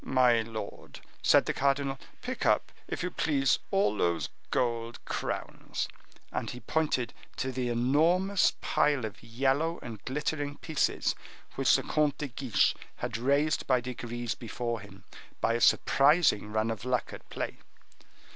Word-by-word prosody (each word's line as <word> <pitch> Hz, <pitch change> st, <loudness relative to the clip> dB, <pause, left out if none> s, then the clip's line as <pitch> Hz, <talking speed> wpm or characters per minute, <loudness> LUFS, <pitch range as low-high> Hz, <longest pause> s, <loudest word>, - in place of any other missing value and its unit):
"My 125 Hz, -3 st, +4 dB
lord," 110 Hz, -2 st, -7 dB, 0.2 s
said -, -, +5 dB
the -, -, 0 dB
cardinal, 140 Hz, 0 st, +1 dB, 0.2 s
"pick -, -, -3 dB
up, -, -, +2 dB, 0.2 s
if -, -, -3 dB
you 180 Hz, -, -2 dB
please, 135 Hz, -5 st, +2 dB
all 195 Hz, -, +2 dB
those 85 Hz, -4 st, 0 dB, 0.2 s
gold 115 Hz, -1 st, -1 dB
crowns." -, -, -3 dB, 0.4 s
And -, -, -2 dB
he 125 Hz, -, -6 dB
pointed 130 Hz, -2 st, 0 dB, 0.2 s
to 130 Hz, -, -1 dB
the 125 Hz, -1 st, -2 dB
enormous 165 Hz, +11 st, +3 dB
pile 145 Hz, -5 st, +2 dB
of 110 Hz, -, -7 dB
yellow 135 Hz, +8 st, 0 dB
and 110 Hz, -4 st, -8 dB
glittering 145 Hz, +1 st, -2 dB
pieces 160 Hz, -3 st, 0 dB, 0.4 s
which -, -, +4 dB
the -, -, +1 dB
Comte 150 Hz, -2 st, +1 dB
de 145 Hz, -, -4 dB
Guiche 125 Hz, -2 st, +2 dB, 0.2 s
had 120 Hz, -2 st, -4 dB
raised 140 Hz, +6 st, +1 dB
by 130 Hz, -2 st, +4 dB
degrees 120 Hz, -1 st, -4 dB
before 120 Hz, -1 st, -4 dB
him 100 Hz, -2 st, -13 dB, 0.4 s
by 115 Hz, -, +2 dB
a 120 Hz, -, -1 dB
surprising 140 Hz, -, +4 dB
run 110 Hz, +1 st, +1 dB
of 110 Hz, -, -5 dB
luck 125 Hz, -1 st, -1 dB
at -, -, -11 dB
play. -, -, -4 dB
125 Hz, 145 wpm, -30 LUFS, 115-145 Hz, 0.4 s, said